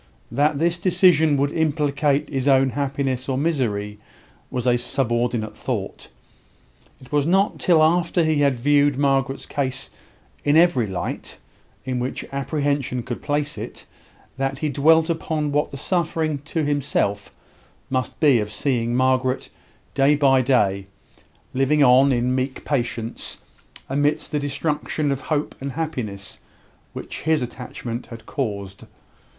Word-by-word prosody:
That 145 Hz, +4 st, +2 dB
this 170 Hz, +3 st, +1 dB
decision 165 Hz, -5 st, +4 dB
would 140 Hz, +1 st, +1 dB
implicate 150 Hz, -2 st, +1 dB
his 135 Hz, -1 st, -2 dB
own 135 Hz, -1 st, +4 dB
happiness 135 Hz, 0 st, -2 dB
or 130 Hz, -, 0 dB
misery 110 Hz, -9 st, -1 dB, 0.5 s
was 125 Hz, -1 st, -3 dB
a 125 Hz, -1 st, +4 dB
subordinate 120 Hz, -3 st, -1 dB
thought. -, -, -4 dB, 0.9 s
It 130 Hz, -, -16 dB
was 145 Hz, 0 st, +2 dB
not 195 Hz, +4 st, +2 dB
till 165 Hz, -3 st, +4 dB
after 170 Hz, +1 st, +2 dB
he 155 Hz, -1 st, +2 dB
had 140 Hz, -2 st, +3 dB
viewed 145 Hz, +2 st, +3 dB
Margaret's 135 Hz, -1 st, +1 dB
case 135 Hz, -1 st, -2 dB, 0.5 s
in 145 Hz, +1 st, +4 dB
every 165 Hz, -10 st, +4 dB
light, 95 Hz, -2 st, -5 dB, 0.5 s
in 130 Hz, -1 st, -2 dB
which 125 Hz, +2 st, -3 dB
apprehension 140 Hz, -3 st, -1 dB
could 120 Hz, 0 st, -5 dB
place 145 Hz, 0 st, -2 dB
it, -, -, -8 dB, 0.5 s
that 135 Hz, 0 st, -1 dB
he 150 Hz, +2 st, -1 dB
dwelt 160 Hz, +4 st, +4 dB
upon 160 Hz, -3 st, -1 dB
what 145 Hz, +1 st, +1 dB
the 140 Hz, -, -8 dB
suffering 160 Hz, -2 st, -1 dB
to 160 Hz, 0 st, -1 dB
himself 140 Hz, -8 st, -1 dB, 0.6 s
must 130 Hz, -1 st, -2 dB
be 145 Hz, -7 st, +5 dB
of 105 Hz, 0 st, -3 dB
seeing 120 Hz, +1 st, 0 dB
Margaret, 130 Hz, 0 st, +1 dB, 0.4 s
day 140 Hz, +2 st, +4 dB
by 135 Hz, -3 st, +4 dB
day, 100 Hz, -7 st, +1 dB, 0.7 s
living 135 Hz, +3 st, +3 dB
on, 135 Hz, +2 st, +6 dB
in 125 Hz, 0 st, +1 dB
meek 130 Hz, +1 st, -2 dB
patience, 120 Hz, -4 st, -3 dB, 0.5 s
amidst 145 Hz, +2 st, 0 dB
the 150 Hz, -, 0 dB
destruction 145 Hz, +1 st, -1 dB
of 135 Hz, -, -2 dB
hope 150 Hz, -1 st, -2 dB
and 135 Hz, -1 st, -4 dB
happiness 115 Hz, -11 st, -4 dB, 0.5 s
which -, -, -7 dB
his 160 Hz, -3 st, +1 dB
attachment 120 Hz, -1 st, -6 dB
had 115 Hz, -1 st, -10 dB
caused. 100 Hz, -7 st, -4 dB
140 Hz, 135 wpm, -22 LUFS, 125-150 Hz, 0.9 s, on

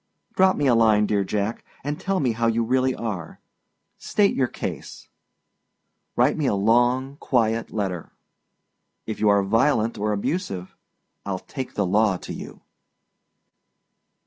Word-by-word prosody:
Drop 190 Hz, 0 st, +4 dB
me 145 Hz, -, 0 dB
a 130 Hz, -, +5 dB
line, 110 Hz, -2 st, +4 dB
dear 100 Hz, -1 st, +1 dB
Jack, 105 Hz, +3 st, -2 dB, 0.2 s
and 145 Hz, +2 st, -3 dB
tell 195 Hz, -1 st, -1 dB
me 130 Hz, -4 st, +1 dB
how 115 Hz, +1 st, 0 dB
you 115 Hz, 0 st, +1 dB
really 130 Hz, +2 st, +1 dB
are. 100 Hz, -8 st, -5 dB, 0.6 s
State 205 Hz, -1 st, +2 dB
your 130 Hz, -, +1 dB
case. -, -, -7 dB, 1.1 s
Write 125 Hz, +4 st, +3 dB
me 150 Hz, -3 st, 0 dB
a -, -, +2 dB
long, 120 Hz, +6 st, +2 dB
quite 115 Hz, -5 st, 0 dB
letter. 95 Hz, -6 st, -3 dB, 0.9 s
If 110 Hz, -, -5 dB
you 105 Hz, -, +3 dB
are 100 Hz, -1 st, +4 dB
violent 115 Hz, +1 st, +2 dB
or 105 Hz, +1 st, 0 dB
abusive, 100 Hz, -, -3 dB, 0.5 s
Iâll 95 Hz, -2 st, -4 dB
take 130 Hz, -3 st, -6 dB
the 100 Hz, -, +1 dB
law 100 Hz, +1 st, +2 dB
to -, -, -8 dB
you. -, -, -9 dB
115 Hz, 145 wpm, -24 LUFS, 105-130 Hz, 1.1 s, a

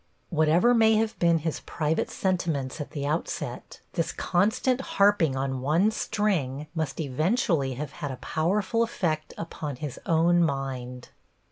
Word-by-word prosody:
Whatever 165 Hz, +8 st, +4 dB
may 220 Hz, -2 st, +5 dB
have 220 Hz, 0 st, 0 dB
been 170 Hz, -1 st, +4 dB
his 160 Hz, 0 st, -2 dB
private 155 Hz, 0 st, -1 dB
sentiments 165 Hz, -7 st, -1 dB
at 145 Hz, -, -6 dB
the 140 Hz, -2 st, -4 dB
outset, 155 Hz, +3 st, -4 dB
this 165 Hz, -2 st, -1 dB
constant 220 Hz, +8 st, +1 dB, 0.2 s
harping 200 Hz, -8 st, +4 dB
on 135 Hz, -1 st, -2 dB
one 165 Hz, +10 st, +3 dB
string 185 Hz, -, -1 dB
must 155 Hz, -5 st, -3 dB
eventually 155 Hz, -, 0 dB
have 145 Hz, +2 st, -5 dB
had 150 Hz, -4 st, -5 dB
a 130 Hz, -, -5 dB
powerful 190 Hz, -, 0 dB
effect 165 Hz, -9 st, -1 dB
upon 155 Hz, -3 st, -5 dB
his 145 Hz, 0 st, -6 dB
own 170 Hz, +1 st, +4 dB
mind. 130 Hz, -4 st, -3 dB
160 Hz, 140 wpm, -27 LUFS, 140-190 Hz, 0.2 s, may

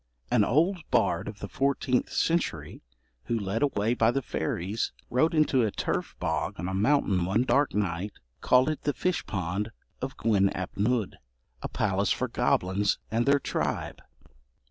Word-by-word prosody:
An -, -, +4 dB
old 170 Hz, -, +2 dB
bard -, -, +1 dB
of 100 Hz, 0 st, -8 dB
the 100 Hz, -, -4 dB
fourteenth 130 Hz, +3 st, 0 dB
century, 115 Hz, -, -1 dB, 0.4 s
who, 120 Hz, -, 0 dB
led 100 Hz, +1 st, -2 dB
away 120 Hz, -5 st, +1 dB
by 115 Hz, -2 st, +3 dB
the 135 Hz, +2 st, 0 dB
fairies, 95 Hz, +5 st, -2 dB, 0.2 s
rode 155 Hz, +7 st, +2 dB
into 150 Hz, -4 st, +3 dB
a 110 Hz, -, +2 dB
turf -, -, -3 dB
bog -, -, -2 dB
on 90 Hz, -, -3 dB
a 95 Hz, -, -3 dB
mountain 100 Hz, -3 st, +2 dB
one 100 Hz, +7 st, +2 dB
dark 140 Hz, 0 st, +2 dB
night, 100 Hz, 0 st, -1 dB, 0.3 s
called 130 Hz, +1 st, +4 dB
it 155 Hz, -, -3 dB
the 145 Hz, -, 0 dB
'fish 180 Hz, -1 st, -1 dB
pond 95 Hz, +2 st, -2 dB, 0.3 s
of 135 Hz, +1 st, -4 dB
Gwyn 100 Hz, -4 st, +3 dB
ap 90 Hz, -1 st, -5 dB
Nudd, 110 Hz, 0 st, 0 dB, 0.4 s
a -, -, -4 dB
palace 100 Hz, -1 st, 0 dB
for -, -, 0 dB
goblins 95 Hz, +3 st, +1 dB
and 115 Hz, +3 st, +1 dB
their 140 Hz, +1 st, +6 dB
tribe.' -, -, -3 dB
110 Hz, 165 wpm, -28 LUFS, 95-135 Hz, 0.4 s, their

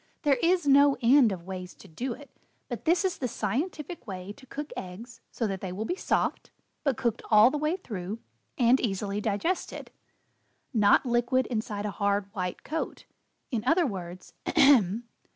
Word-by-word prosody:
"There 280 Hz, -4 st, +3 dB
is 345 Hz, -2 st, +2 dB
no 280 Hz, 0 st, +6 dB
end 245 Hz, -1 st, +6 dB
of 180 Hz, -3 st, -5 dB
ways 185 Hz, -1 st, -7 dB
to -, -, -15 dB
do 240 Hz, +10 st, -4 dB
it, 285 Hz, +4 st, -13 dB, 0.4 s
but -, -, -6 dB
this 350 Hz, +4 st, +3 dB
is 370 Hz, -, -1 dB
the 255 Hz, -, -1 dB
scientific 295 Hz, -, -3 dB
way 190 Hz, 0 st, -6 dB
to 260 Hz, +4 st, -17 dB
cook 295 Hz, +3 st, -6 dB
eggs 220 Hz, +7 st, -8 dB
so 235 Hz, -, -2 dB
that 195 Hz, -3 st, -3 dB
they 190 Hz, -, -4 dB
will 205 Hz, +4 st, -4 dB
be 355 Hz, -, -1 dB
soft, -, -, -1 dB, 0.3 s
but 275 Hz, -6 st, +1 dB
cooked 235 Hz, -3 st, -1 dB
all 215 Hz, +3 st, +7 dB
the 300 Hz, -, -2 dB
way 305 Hz, +3 st, +1 dB
through 205 Hz, -, -5 dB, 0.4 s
and 245 Hz, +1 st, +5 dB
easily 200 Hz, -2 st, -2 dB
digested 220 Hz, -, -2 dB, 0.8 s
not 210 Hz, +2 st, +4 dB
liquid 245 Hz, +1 st, +2 dB
inside 215 Hz, -2 st, -2 dB
a 210 Hz, -, -2 dB
hard, 200 Hz, 0 st, -1 dB
white 180 Hz, -3 st, -4 dB
coat. 320 Hz, +2 st, -4 dB, 0.5 s
In 225 Hz, -4 st, -1 dB
other 335 Hz, +4 st, +4 dB
Words 185 Hz, -6 st, -6 dB
Ahem! 235 Hz, -6 st, +5 dB
230 Hz, 170 wpm, -28 LUFS, 200-280 Hz, 0.8 s, all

